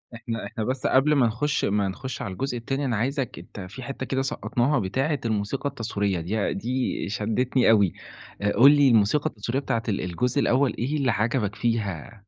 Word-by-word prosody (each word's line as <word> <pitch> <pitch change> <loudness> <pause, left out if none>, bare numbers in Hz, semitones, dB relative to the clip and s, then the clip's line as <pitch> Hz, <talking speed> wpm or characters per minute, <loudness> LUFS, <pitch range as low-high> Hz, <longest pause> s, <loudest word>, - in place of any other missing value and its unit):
إحنا 115 -1 -5
إحنا 110 - -4
بس 130 +3 -1
قبل 140 +3 +4
ما 125 -4 +4
نخُش 150 +7 0
ما 100 -1 +1
نخُش 130 +7 -5
على 100 -6 -4
الجزء 130 +4 -3
التاني، 135 +4 -2
أنا 120 -4 0
عايزك 130 +3 -2
أنت - - -11
في 100 +8 -8
حتة 130 +1 -5
كده 135 +1 -1
سقّطناها 135 +1 0
بتاعة 135 +9 -1
الموسيقى 110 +6 -1
التصويرية، 105 -7 -2
دي 100 +5 -1
دي 125 0 -2
شدّتني 115 +4 +1
أوي 100 -5 +4 0.5
آآ، 105 0 +1
قُل 140 +4 +7
لي 145 -2 +5
الموسيقى 115 +7 +3
التصويرية 115 +4 -3
بتاعة 115 -3 -1
ال 100 - -1
الجزء 120 +10 -1
الأول 130 -2 +2
إيه 135 +6 -1
اللي 135 -4 +2
عَجَبك 110 -1 0
فيها؟ 110 -4 -2
120 Hz, 185 wpm, -25 LUFS, 105-135 Hz, 0.5 s, قُل